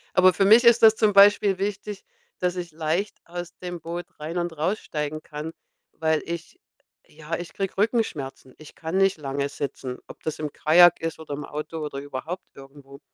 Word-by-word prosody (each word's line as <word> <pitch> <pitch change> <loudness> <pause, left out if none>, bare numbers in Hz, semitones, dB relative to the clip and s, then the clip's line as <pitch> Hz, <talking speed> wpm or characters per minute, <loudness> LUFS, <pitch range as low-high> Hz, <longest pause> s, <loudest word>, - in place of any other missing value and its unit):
Aber 185 0 +6
für 195 - +2
mich 225 +4 +7
ist 235 -1 +6
das 220 0 +8
zum 215 -2 +2
Beispiel 200 -1 +6
wichtig, 200 0 -4 0.4
dass 180 0 0
ich 175 -2 -5
leicht 165 +6 -2
aus 175 0 -7
dem 175 -1 -6
Boot 170 +2 -5
rein 160 +3 -5
und 175 -2 -2
raussteigen 155 -3 -2
kann, 150 +2 -7 0.4
weil 160 -1 0
ich 170 0 -7 0.5
ja, 155 +2 -6
ich 175 -1 -7
kriege 195 -1 -3
Rückenschmerzen. 195 - -1
Ich 155 - -14
kann 165 +2 -5
nicht 195 -2 +3
lange 140 -1 -3
sitzen, 135 -3 -5
ob - - -12
das 155 0 -3
im 150 -2 -4
Kajak 175 +2 +6
ist 165 0 -3
oder 155 -2 -7
im 145 +1 -5
Auto 155 +2 -6
oder 145 -2 -4
überhaupt 145 +6 -6
irgendwo 140 0 -14
165 Hz, 185 wpm, -25 LUFS, 150-190 Hz, 0.5 s, das